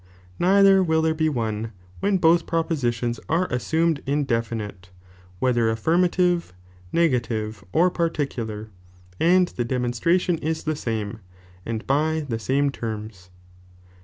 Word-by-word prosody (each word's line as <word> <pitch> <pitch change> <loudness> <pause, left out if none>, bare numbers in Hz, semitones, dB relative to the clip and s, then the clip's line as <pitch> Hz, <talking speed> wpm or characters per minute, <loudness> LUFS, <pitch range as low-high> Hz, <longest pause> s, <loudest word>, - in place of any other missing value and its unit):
Neither 195 +1 +5
will 160 -3 +2
there 160 0 +2
be 160 0 +1
one, 110 -4 -3 0.3
when 200 0 +2
both 170 -1 +3
propositions 125 -8 -1
are 170 +4 +2
assumed 160 +4 +1
indefinite, 115 -9 -2 0.5
whetheraffirmative, 160 - +1 0.4
negative, 115 - 0
orparticular, 140 - -1 0.5
and 180 +1 +4
the 120 - -3
^. - - -7
demonstration 130 +8 +1
is 160 0 -2
the 155 0 -1
same 110 -5 -3 0.5
and 115 +1 -3
by 155 +3 +1
the 115 -3 -2
same 140 +5 +1
tcrms. 110 -6 -6
140 Hz, 110 wpm, -24 LUFS, 115-165 Hz, 0.5 s, Neither